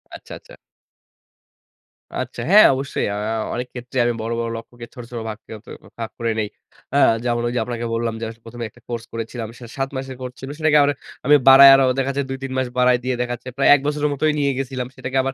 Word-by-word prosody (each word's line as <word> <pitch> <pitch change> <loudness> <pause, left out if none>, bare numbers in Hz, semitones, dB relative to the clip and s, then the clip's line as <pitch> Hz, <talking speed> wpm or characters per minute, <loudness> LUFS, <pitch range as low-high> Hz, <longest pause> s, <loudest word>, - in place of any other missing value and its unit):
আচ্ছা, - - -11
আচ্ছা। - - -16 1.6
আচ্ছা। - - -4
হ্যাঁ, 210 +2 +8
অবশ্যই। 135 +1 -2
আ - - -3 0.4
অনেক 125 +1 -3
ক্ষেত্রে 125 +1 -7
আমি 120 - +1
বড়, 115 +1 -3
বড় 115 0 -2
লক্ষ্যকে 120 +1 -10
ছোট, 125 - -9
ছোট 120 - -5
ভাগ 110 - -6
কে - - -15
অ - - -15
ত - - -36 0.3
ভাগ 115 - -4
করে 115 -1 0
নেই। 105 - -1 0.5
আ - - +4 0.3
যেমন 120 -1 0
ওইযে 120 +1 -1
আপনাকে 120 -1 -4
বললাম 115 0 -1
যে 115 - -6
আস 115 - -11
১ম 120 +1 -11
এ - - -2
একটা - - -22
কোর্স 120 -2 -4
করেছিলাম। 115 0 -5
সেটা 120 -2 -11
৭ 135 0 -1
মাসের 130 0 -5
কোর্স 125 -1 -6
ছিলো। 135 +1 -7
সেটাকে 155 -1 +4
আবার 145 0 +3 0.3
আমি 150 +2 +6
বাড়ায় 135 +1 +10
আরো 135 - +4
ওদের 135 +1 -1
কাছে 140 +1 -1
২-৩ 135 0 -5
মাস 130 -1 0
বাড়ায় 125 0 +4
দিয়ে 130 0 -1
দেখা 120 0 -2
যাচ্ছে 125 - -10
প্রায় 135 - +4
১ - - 0
বছরের 150 0 0
মতোই 155 +2 +1
নিয়ে 140 -1 +2
গেছিলাম। 130 -2 -3
সেটাকে 130 +1 -4
আবার 135 - -2
125 Hz, 230 wpm, -21 LUFS, 120-135 Hz, 1.6 s, বাড়ায়